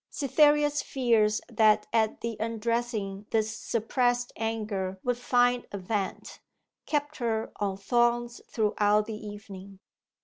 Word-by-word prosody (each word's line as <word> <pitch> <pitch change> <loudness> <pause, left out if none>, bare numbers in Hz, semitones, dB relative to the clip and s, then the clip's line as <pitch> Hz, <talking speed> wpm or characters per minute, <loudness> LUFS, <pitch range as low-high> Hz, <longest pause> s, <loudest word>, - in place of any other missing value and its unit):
Cytherea's 295 +1 +3
fears 225 -5 +2
that 215 -2 +3
at 220 -1 +1
the 230 -1 -3
undressing 225 -3 -2
this 220 0 0
suppressed 245 +2 0
anger 210 -4 -3
would 245 -1 -1
find 245 0 +2
a 200 - -4
vent, 195 0 -4 0.5
kept 295 0 -1
her 225 -3 -1
on 200 -2 -2
thorns 240 +3 +1
throughout 210 -1 +2
the 220 - -6
evening. 200 -2 -9
225 Hz, 115 wpm, -28 LUFS, 210-240 Hz, 0.5 s, Cytherea's